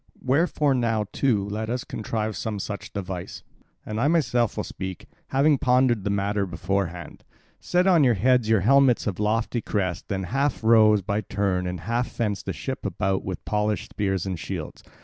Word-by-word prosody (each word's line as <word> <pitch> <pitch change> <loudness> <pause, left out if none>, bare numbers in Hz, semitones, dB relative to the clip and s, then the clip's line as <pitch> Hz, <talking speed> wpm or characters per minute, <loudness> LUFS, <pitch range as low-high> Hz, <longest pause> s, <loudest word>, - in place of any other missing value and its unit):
Wherefore 145 +1 +2
now 115 -4 0
too 110 -8 +1
let 110 +2 -4
us 125 +1 -2
contrive 110 -4 -3
some 105 +4 -3
such 100 +1 -6
device, 90 -2 -6 0.4
and 110 +1 -3
I 140 - +3
myself 125 -8 +1
will - - -1
speak, 95 -2 -6 0.2
having 140 +1 +3
pondered 125 -4 +3
the 100 - -1
matter 100 0 0
beforehand. 90 -1 -3 0.4
Set 180 +1 +1
on 175 -5 +5
your 125 -3 +4
heads 125 +2 +2
your 110 -3 +4
helmets 135 +3 +4
of 100 -3 -3
lofty 110 +2 0
crest, 95 -6 -2
then 95 -1 -2
half 135 +6 -1
row 110 -2 +6
by 100 +2 -1
turns, 95 -3 -1
and 90 -2 -4
half 120 +5 -1
fence 105 -5 -2
the - - -4
ship 135 -1 -5
about 95 0 -1
with 95 -2 -6
polished 105 -2 -1
spears 95 -3 -1
and 95 -3 -3
shields. - - -6
105 Hz, 175 wpm, -25 LUFS, 100-125 Hz, 0.4 s, row